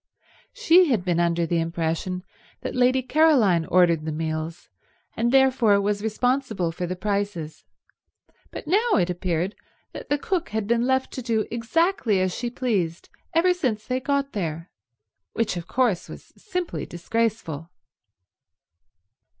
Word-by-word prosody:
She 370 -6 +5
had 215 -8 +1
been 175 -2 +1
under 170 0 +1
the 170 +1 0
impression 165 +2 -2 0.4
that - - -4
Lady 255 +1 +3
Caroline 255 - +4
ordered 170 -3 +3
the 160 - -3
meals 160 +1 -4 0.5
and 235 +1 +1
therefore 260 -6 +4
was 205 0 0
responsible 220 -4 0
for 175 +2 -4
the 185 - -3
prices, 200 -5 -3 0.8
but - - -8
now 420 +9 +2
it 180 -1 +2
appeared 175 +1 -2 0.4
that - - -9
the 290 - +2
cook 350 +3 -2
had 220 -1 -2
been 235 +3 +1
left 260 0 +1
to 260 - -4
do 225 -3 0
exactly 240 - +1
as 185 -1 0
she 240 - -3
pleased 200 -10 -2 0.3
ever 360 +2 +4
since 250 -12 -2
they 255 0 -1
got 280 +1 -1
there, 165 -4 -4 0.6
which 225 -4 0
of 170 -1 -6
course 240 -8 0
was - - -12
simply 360 -4 -4
disgraceful. 175 -4 -2
215 Hz, 140 wpm, -24 LUFS, 175-260 Hz, 0.8 s, She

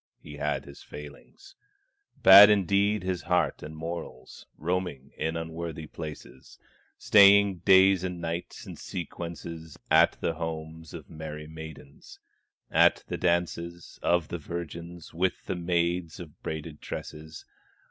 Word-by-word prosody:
he 75 -1 -11
had 75 +1 -2
his 70 0 -13
failings, 75 - -12 0.7
Bad 100 +2 +11
indeed 100 0 +2
his 90 -1 -2
heart 90 0 0
and 80 +1 -9
morals, 80 -6 -8
Roaming 85 -5 -3
in 80 +1 -2
unworthy 80 -1 -6
places, 75 -4 -10 0.4
Staying 100 -2 +6
days 95 0 +5
and 90 -1 -4
nights 85 +1 -5
in - - -9
sequence 85 -1 -7 0.5
At - - +6
the 85 - -1
homes 80 0 -6
of 80 -4 -10
merry 75 -1 -8
maidens, 80 -2 -11 0.5
At - - +4
the - - -3
dances 85 0 -2
of 85 -3 +1
the 85 - -4
virgins, 85 +1 -7
With 90 +3 -1
the - - -3
maids 85 -1 -1
of 80 -4 -11
braided 80 -1 -6
tresses. 80 0 -8
85 Hz, 125 wpm, -27 LUFS, 80-90 Hz, 0.7 s, Bad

